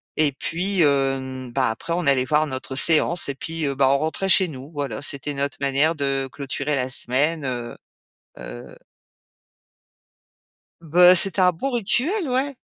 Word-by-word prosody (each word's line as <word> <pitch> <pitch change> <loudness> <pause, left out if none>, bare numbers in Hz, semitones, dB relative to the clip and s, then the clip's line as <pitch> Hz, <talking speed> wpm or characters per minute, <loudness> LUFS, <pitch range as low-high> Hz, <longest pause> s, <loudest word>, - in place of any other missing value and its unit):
Et 150 -2 +1
puis, 180 +6 -2
hem, 135 -3 -1
bah, - - 0
après, 125 +9 -7
on 175 -3 -2
allait 135 -2 +3
voir 150 +3 0
notre 130 -1 -7
séance. 160 +3 +4
Et 140 - -4
puis, 165 +1 -5
heu, 140 - -3
bah, 135 0 +2
on 140 - +2
rentrait 160 +6 -3
chez 190 0 +5
nous. 140 -1 -11
Voilà, 140 -6 -5
c'était 145 0 -3
notre 140 0 -3
manière 140 +4 +1
de 135 -2 -2
clôturer 140 +1 -4
la 125 0 -2
semaine, 140 +5 +1
heu 120 -2 -5 0.6
heu - - -11 2.1
Bah, 175 +3 +5
c'était 190 +1 +3
un 180 0 +4
bon 260 +12 -5
rituel, 260 - 0
ouais. 265 +2 -2
145 Hz, 160 wpm, -21 LUFS, 135-170 Hz, 2.1 s, chez